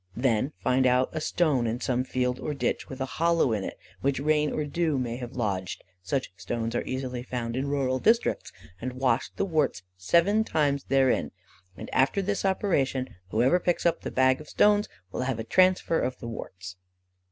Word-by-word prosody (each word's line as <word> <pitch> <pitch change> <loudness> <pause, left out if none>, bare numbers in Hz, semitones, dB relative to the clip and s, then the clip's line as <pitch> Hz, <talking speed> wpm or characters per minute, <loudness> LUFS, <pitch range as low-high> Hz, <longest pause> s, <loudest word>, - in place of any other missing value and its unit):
Then 120 +2 +1
find 130 0 +2
out 125 +1 +3
a 155 - -4
stone 150 -8 +1
in 115 +2 -2
some 125 -1 0
field 125 -1 -1
or 150 - -3
ditch - - -2
with 130 - -7
a - - +1 0.2
hollow 165 -7 +3
in 100 -3 -2 0.3
which 140 -1 +1
rain 150 +1 +2
or 150 - -2
dew 155 0 0
may 120 -2 -2
have 120 -2 -7
lodged 95 -6 -2 0.2
(such 95 +3 -2
stones 115 -1 -3
are 120 - 0
easily 130 -1 -3
found 120 -2 -4
in 135 +2 -1
rural 135 -2 0
districts), 230 - +2 0.3
and 130 +1 -3
wash 130 0 +1
the - - 0
warts 155 - 0
seven 170 - +3
times 145 -8 0
therein, 135 -2 +2 0.5
and - - -7
after 135 +10 +2
this 200 +1 -1
operation, 140 -10 +1 0.2
whoever 125 - +3
picks 175 0 0
up 170 - +2
the - - -4
bag 130 +1 +3
of 150 - -12
stones 210 0 +3 0.2
will - - -3
have 130 -2 -1
a 110 - -3
transfer 185 +5 +3
of 130 - -2
the 120 - -8
warts." 90 -5 -8
130 Hz, 185 wpm, -27 LUFS, 125-155 Hz, 0.5 s, out